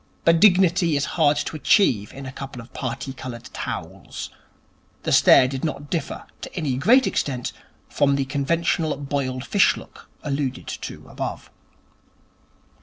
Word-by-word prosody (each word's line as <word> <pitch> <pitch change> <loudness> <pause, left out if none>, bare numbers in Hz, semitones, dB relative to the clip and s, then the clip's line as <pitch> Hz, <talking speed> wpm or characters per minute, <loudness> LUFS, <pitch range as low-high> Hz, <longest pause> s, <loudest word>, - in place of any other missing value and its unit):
But 165 0 +5
dignity 180 -4 +4
is 140 - 0
hard 150 -3 +3
to 150 - -3
achieve 130 - +3
in 135 0 -9
a 130 - -6
couple 135 -1 -8
of 115 +1 -12
parti 130 +1 -4
coloured 120 -3 -8
towels. - - -6 0.7
The - - -1
stare 130 - +7
did 130 0 -5
not 145 -2 -4
differ 165 -5 -3 0.2
to - - -8
any 150 -7 -1
great 240 - +5
extent 125 -4 -1 0.4
from 140 -1 +2
the 140 -1 0
conventional 155 +3 0
boiled 135 -2 -3
fish 200 - +3
look, - - -13
alluded 140 -3 -2
to - - -7
above. - - -6
140 Hz, 145 wpm, -23 LUFS, 130-165 Hz, 0.7 s, stare